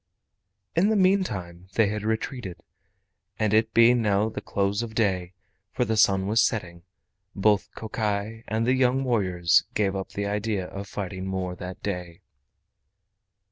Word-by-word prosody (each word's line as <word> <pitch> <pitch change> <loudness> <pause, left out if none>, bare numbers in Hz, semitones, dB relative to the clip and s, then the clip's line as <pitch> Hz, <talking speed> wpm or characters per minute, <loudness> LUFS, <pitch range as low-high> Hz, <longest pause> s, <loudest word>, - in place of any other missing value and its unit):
In 185 +5 +4
the 220 - +2
meantime 100 - 0
they 110 - +5
had 105 0 -3
retreated, 110 -4 -3 0.7
and 110 -2 +1
it 110 +1 +3
being 115 +1 +5
now 105 0 +2
the - - -6
close 100 +2 -1
of 115 -2 -6
day, 95 -5 0 0.4
for 125 - +1
the 110 - 0
sun 95 -3 +4
was 110 +3 +3
setting, 90 -7 -1 0.5
both 105 0 +2
Kokai 110 0 -3
and 110 +2 0
the 125 - +3
young 130 0 +2
warriors 90 -9 +2
gave 100 -2 +1
up 95 -1 -5
the 100 - -2
idea 105 -1 -1
of 100 +2 -7
fighting 95 -2 -5
more 95 -1 -3
that 90 +1 -8
day. 90 -4 -5
105 Hz, 150 wpm, -26 LUFS, 95-115 Hz, 0.7 s, they